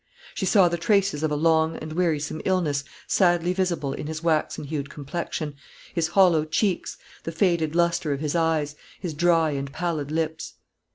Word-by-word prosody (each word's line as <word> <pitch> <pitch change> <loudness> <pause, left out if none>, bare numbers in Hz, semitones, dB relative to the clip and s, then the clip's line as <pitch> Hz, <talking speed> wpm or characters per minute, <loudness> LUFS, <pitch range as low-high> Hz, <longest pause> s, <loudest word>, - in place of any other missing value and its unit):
She 190 - -2
saw 190 -1 +6
the 170 0 -2
traces 195 -2 +2
of 155 - +1
a 150 - -1
long 160 +1 +2
and 155 0 -7
wearisome 155 -3 -1
illness 160 -7 +1 0.2
sadly 175 -1 +2
visible 175 -7 -1
in 150 - -5
his 160 +1 -5
waxen 160 -3 0
hued 145 -1 -4
complexion, 150 +1 -4 0.4
his 170 -3 +1
hollow 175 -3 +4
cheeks, 175 +4 -1 0.2
the 165 - -5
faded 165 -2 +1
lustre 170 -2 +2
of 140 - -1
his 150 +1 -2
eyes, 160 -3 +1 0.2
his 175 -4 -4
dry 165 0 +3
and 140 -1 -4
pallid 155 -2 -2
lips. 160 0 -3
160 Hz, 170 wpm, -25 LUFS, 150-175 Hz, 0.4 s, saw